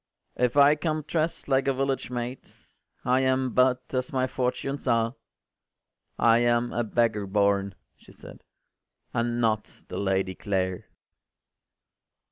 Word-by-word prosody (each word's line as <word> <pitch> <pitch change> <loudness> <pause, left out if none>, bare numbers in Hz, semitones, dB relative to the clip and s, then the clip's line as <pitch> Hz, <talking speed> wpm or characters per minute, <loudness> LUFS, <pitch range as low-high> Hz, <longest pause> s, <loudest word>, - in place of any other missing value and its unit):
” - - -48
“If 125 +3 -2
I 140 +1 +7
come 155 0 -2
drest 160 +2 -2
like 135 0 +2
a 135 - +2
village 135 -1 -1
maid, 125 +1 -5 0.6
I 125 +1 +3
am 130 -1 +1
but 125 0 +3
as 130 -1 -1
my 130 -1 +1
fortunes 130 +2 -3
are: 115 -1 +2 1.0
I 115 0 +5
am 120 0 +1
a 120 - 0
beggar 110 -2 0
born,” 100 -1 +1 0.2
she - - -18
said, - - -13 0.7
“And 120 0 -1
not 110 -2 0 0.2
the - - -4
Lady 95 -1 0
Clare. 95 -2 -2
120 Hz, 135 wpm, -26 LUFS, 110-130 Hz, 1.0 s, I